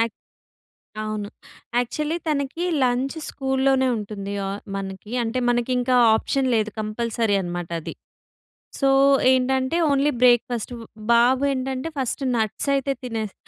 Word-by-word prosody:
Yeah 230 - +5 1.0
అవును. 215 -1 -4 0.5
Actually 300 +6 -1
తనకి 285 +3 -1 0.2
lunch 255 +4 0
స్కూల్‌లోనే 265 -1 +1
ఉంటుంది 200 -1 -6
ఆహ్, 200 +1 -5
మనకి. 195 +2 -6
అంటే 230 +3 -1
మనకింకా 250 +1 +1 0.2
ఆప్షన్ 265 +4 0
లేదు 215 0 +1
కంపల్సరీ 220 0 -1
అనమాట 175 -1 -5
అది. - - -6 0.9
సో 275 - +3 0.4
ఏంటంటే 260 +3 +1
ఓన్లీ 280 +1 +3
బ్రేక్‌ఫాస్ట్. 245 -1 +3 0.4
బాబు 250 +3 +4
ఏంటంటే 265 +2 -3
ఫస్ట్ 265 +1 -2
నట్స్ 220 +5 -1
అయితే 275 0 0
తినేస్ 220 -4 -4
245 Hz, 115 wpm, -23 LUFS, 215-265 Hz, 1.0 s, Yeah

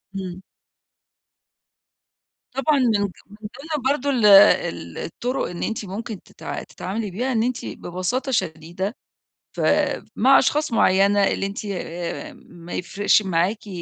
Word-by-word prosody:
امم. 185 -1 -6 2.1
طبعًا 275 +2 +1
من 225 -5 +2
من 200 - 0 0.3
ضمن 275 +7 -5
برضه 285 0 0
ال 250 -6 +2
ال 200 -1 +5
الطُرُق 250 +2 -3
إن 175 - -5
أنتِ 225 -1 -3
ممكن 205 +2 -6
تتع - - -7
تتعاملي 205 +2 -5
بيها، 245 +8 -2
إن 225 -2 +1
أنتِ 250 0 -2
ببساطة 210 +10 -3
شديدة 180 - -2 0.6
ف - - -4 0.6
مع 265 +4 +6
أشخاص 300 +1 +1
معينة، 200 -1 +4
اللي 195 - 0
أنتِ 200 +2 -6
آآ 180 - -5
ما 175 -7 -13
يفرقش 205 +4 +2
معاكِ 190 +3 -1
205 Hz, 125 wpm, -22 LUFS, 185-250 Hz, 2.1 s, مع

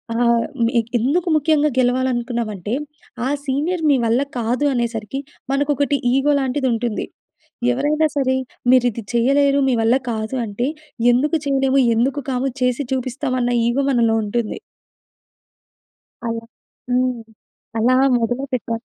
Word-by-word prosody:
ఆహ్, 235 -1 +3 0.2
మే 230 - +1 0.3
ఎందుకు 295 +10 0
ముఖ్యంగా 300 0 +3
గెలవాలనుకున్నామంటే 240 -5 0 0.5
ఆ - - 0 0.2
సీనియర్ 310 +6 -1
మీ 285 - +5
వల్ల 230 +4 +2 0.2
కాదు 245 +5 0
అనేసరికి 235 0 -2 0.3
మనకొకటి 285 0 +1 0.2
ఈగో 275 +2 +3
లాంటిది 265 0 0
ఉంటుంది. 230 -1 -2 0.7
ఎవరైనా 300 +4 +1
సరే 260 -2 +2 0.3
మీరు 255 -1 +5
ఇది 230 +1 -7
చేయలేరు, 275 +4 +3
మీ 255 - +2
వల్ల 225 +2 +4 0.2
కాదు 220 +2 -3
అంటే, 210 +5 -2 0.5
ఎందుకు 295 +7 +2
చేయలేము, 270 0 +2 0.2
ఎందుకు 265 +5 +1
కాము 260 +1 0
చేసి 250 +2 +1
చూపిస్తాం 255 +1 -2
అన్న 245 0 +1 0.2
ఈగో 265 +4 +1
మనలో 230 -3 +3
ఉంటుంది. 215 +1 -2 1.7
అలా. 230 0 -3 0.5
హ్మ్. 250 -1 +1 0.6
అలా 240 +3 +3 0.2
మొదలు 245 +3 -1
పెట్టాలి. 230 -2 -2
255 Hz, 125 wpm, -20 LUFS, 235-275 Hz, 1.7 s, మీ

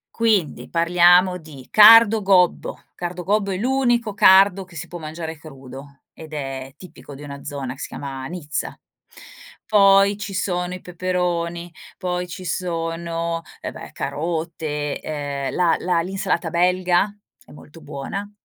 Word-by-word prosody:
Quindi 215 -8 0
parliamo 175 +2 +4
di 145 -6 -13
cardo 220 0 +8
gobbo, 185 -3 +2
cardo 180 0 -5
gobbo 200 +1 0
è 185 - -2
l'unico 240 -1 +1
cardo 195 0 +5
che 180 -2 -17
si 165 +3 -6
può 175 - -8
mangiare 160 0 -7
crudo 140 -1 -12
ed 155 -1 -12
è 135 -2 -5
tipico 160 -5 -12
di 140 - -11
una 140 -1 -9
zona 140 -3 -5
che 135 - -16
si - - -5
chiama 135 -2 -7
Nizza, 160 -3 -5 0.9
poi 200 -1 +5
ci 205 -2 -6
sono 180 -1 -2
i 185 - -10
peperoni 175 -1 -3 0.2
poi 180 -1 -3
ci 180 +1 -8
sono, 165 -1 -3 0.2
eh - - -5
beh, - - -10
carote 155 -2 -3
ehm 145 -2 -4
la 175 -2 +2
la 175 -2 0
l'insalata 185 -2 -2
belga 180 +3 +2 0.3
è - - -19
molto 150 +2 -15
buona, 155 +8 -6
175 Hz, 145 wpm, -21 LUFS, 155-190 Hz, 0.9 s, cardo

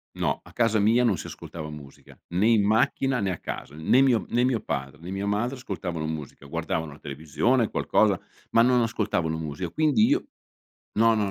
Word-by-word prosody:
No, - - -1
a - - -15
casa 115 -2 +2
mia 115 +4 +4
non 110 -6 +3
si - - -7
ascoltava 75 -2 -8
musica, 70 -2 -12
né 95 +5 +1
in 115 -3 +5
macchina 130 +4 +2
né 100 -1 0
a 85 - -5
casa, 70 - -7
n 80 +1 -8
né 130 - +6
mio 125 -5 +3
né 120 +1 +2
mio 125 -4 +1
padre, 65 -3 -4
né 90 +3 -8
mia 95 +1 -3
madre 105 +6 0
ascoltavano 90 -10 -4
musica, 75 -3 -6
guardavano 80 +1 -3
la 70 - -13
televisione 80 - 0
qualcosa, 100 -4 +2 0.3
ma 115 - +4
non 125 0 +4
ascoltavano 85 -8 -1
musica. 80 +2 -4
Quindi 155 - +3
io 300 +8 +1 0.7
no, 115 0 +5
no, 105 -2 0
100 Hz, 195 wpm, -26 LUFS, 80-120 Hz, 0.7 s, né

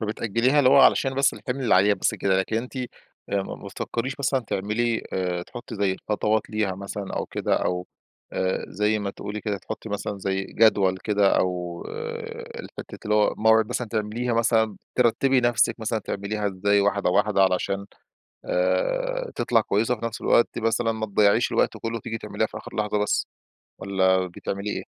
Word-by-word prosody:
فبتأجّليها، 115 +5 +1
اللي 130 -3 +5
هو 140 0 +7
علشان 135 0 +4
بس 135 0 +3
الحِمل 135 0 -4
اللي - - +4
عليها 100 +3 +5
بس - - 0
كده، 95 -1 +1
لكن 105 +4 -1
أنتِ 125 +4 -4
آآ 130 - -1 0.6
ما - - -6
ما - - -11
بتفكّريش 125 +3 -3
مثلًا 135 -1 +1
تعملي 115 +2 -1
آآ 90 -2 -1
تحطّي 120 +6 -9
زي 100 -2 +1
الخطوات 105 +2 -1
ليها 105 -3 0
مثلًا 100 +1 -6
أو - - -2
كده، - - -1
أو 90 0 -1 0.5
آآ 95 0 -1
زي 105 +2 +1
ما 100 -1 -3
تقولي 105 +2 -6
كده 105 -2 -2
تحطّي 110 - -7
مثلًا 105 -1 -4
زي 95 0 -1
جدول 100 -4 +3
كده، 100 -2 +3
أو 90 -2 -2
آآ 470 0 -6
الفكرة - - -9
اللي 105 0 +1
هو 105 -1 +3
موعد 110 0 +4
مثلًا 125 - -3
تعمليها 110 +3 -2
مثلًا 110 -2 +2 0.2
ترتبي 125 +2 +3
نفسِك، 120 -1 +2
مثلًا 110 0 -1
تعمليها 105 +1 -3
إزاي 100 +1 +2
واحدة 100 -2 +1
واحدة، 100 +1 +3
علشان 95 +1 0 0.6
آآ - - 0
تطلع 115 -2 +2
كويسة، 110 +3 +1
وفي 115 -1 -5
نفس 115 0 -5
الوقت 120 - +4
مثلًا 115 +1 +1
ما 110 -1 -3
تضيّعيش 105 +2 +3
الوقت - - +1
كله، 115 0 -3
وتيجي 115 0 -5
تعمليها - - -2
في - - -8
آخر - - -10
لحظة 105 0 0
بس، 105 0 0 0.5
والّا 95 -1 +2
بتعملي 100 +3 -5
إيه؟ - - -4
105 Hz, 180 wpm, -25 LUFS, 100-120 Hz, 0.6 s, هو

